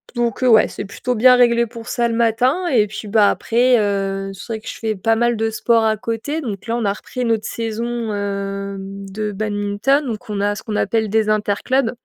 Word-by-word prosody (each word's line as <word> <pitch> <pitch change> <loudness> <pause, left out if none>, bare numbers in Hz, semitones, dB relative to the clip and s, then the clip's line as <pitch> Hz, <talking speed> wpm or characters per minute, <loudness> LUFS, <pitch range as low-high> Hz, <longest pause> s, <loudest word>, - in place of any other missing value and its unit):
donc 240 +1 -1
heu, - - +4
ouais, 220 -2 +6
c'est 205 - -6
plutôt 250 +5 -3
bien 250 +3 +6
réglé 235 -1 +4
pour 230 0 -10
ça, 240 -1 +1
le 230 - -2
matin 245 +10 +2
et 220 -8 +3
puis, 215 +1 -7
bah, 210 -1 +5
après, 245 +2 +2
heu, 195 -1 -1
c'est 225 +4 -7
vrai 220 - -5
que - - -14
je - - -8
fais 220 -2 -1
pas 225 +4 +1
mal 240 0 +2
de 225 0 0
sport 230 +1 +2
à 215 -1 +2
côté, 230 +9 -3
donc 215 -4 -6
là 230 +1 0
on 230 - -2
a 200 - +1
repris 250 +3 -5
notre 225 -1 0
saison, 230 0 -3
hem, 200 -1 -4
de 210 +1 -3
badminton 210 +7 0
donc 220 -3 -6
on 205 -1 -2
a, 205 0 +1
ce - - -8
qu'on 215 -2 -3
appelle 220 +1 0
des 220 0 +1
interclubs 215 +4 +1
220 Hz, 225 wpm, -19 LUFS, 205-235 Hz, -, ouais